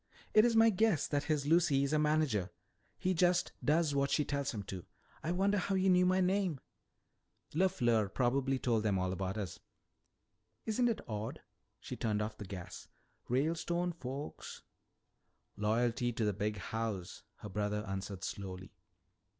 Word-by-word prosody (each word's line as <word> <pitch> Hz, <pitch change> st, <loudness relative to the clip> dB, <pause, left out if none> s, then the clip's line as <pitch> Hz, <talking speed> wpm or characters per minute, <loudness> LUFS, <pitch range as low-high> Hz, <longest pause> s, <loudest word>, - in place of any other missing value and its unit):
"It's 225 Hz, +2 st, +5 dB
my 225 Hz, 0 st, +7 dB
guess 205 Hz, -5 st, +2 dB
that 145 Hz, -1 st, -1 dB
his 150 Hz, -3 st, 0 dB
Lucy 155 Hz, -3 st, +4 dB
is 140 Hz, +2 st, 0 dB
a 155 Hz, -, +3 dB
manager. 150 Hz, -, +1 dB, 0.5 s
He 185 Hz, -, 0 dB
just 180 Hz, 0 st, +2 dB
does 155 Hz, 0 st, +2 dB
what 140 Hz, 0 st, +1 dB
she 150 Hz, -, +2 dB
tells 140 Hz, -1 st, -1 dB
him 105 Hz, -4 st, -4 dB
to. 95 Hz, -2 st, -7 dB, 0.4 s
I 165 Hz, -, -2 dB
wonder 195 Hz, +3 st, +2 dB
how 195 Hz, +1 st, -1 dB
he 190 Hz, 0 st, +3 dB
knew 180 Hz, 0 st, +5 dB
my 185 Hz, +1 st, +3 dB
name?" 185 Hz, -5 st, +1 dB, 0.9 s
"LeFleur 120 Hz, -, +2 dB
probably 135 Hz, +3 st, +1 dB
told 120 Hz, -4 st, +1 dB
them 105 Hz, -3 st, +1 dB
all 95 Hz, 0 st, 0 dB
about 95 Hz, +2 st, -3 dB
us." 95 Hz, -5 st, -4 dB, 1.1 s
"Isn't 240 Hz, +2 st, +2 dB
it 230 Hz, -, -3 dB
odd 110 Hz, -1 st, -4 dB, 0.2 s
" -, -, -48 dB
she -, -, -6 dB
turned 105 Hz, -2 st, -1 dB
off 110 Hz, 0 st, -4 dB
the 105 Hz, -, -6 dB
gas, 90 Hz, -2 st, -8 dB, 0.4 s
"'Ralestone 170 Hz, +6 st, 0 dB
folks.'" 140 Hz, -3 st, -7 dB, 0.9 s
"Loyalty 115 Hz, +3 st, +1 dB
to 110 Hz, -1 st, -1 dB
the 105 Hz, -, +1 dB
Big 105 Hz, +2 st, -2 dB
House," 110 Hz, -3 st, -4 dB
her 105 Hz, -, -9 dB
brother 105 Hz, +2 st, -2 dB
answered 95 Hz, 0 st, -5 dB
slowly. 95 Hz, -1 st, -6 dB
135 Hz, 160 wpm, -34 LUFS, 105-175 Hz, 1.1 s, my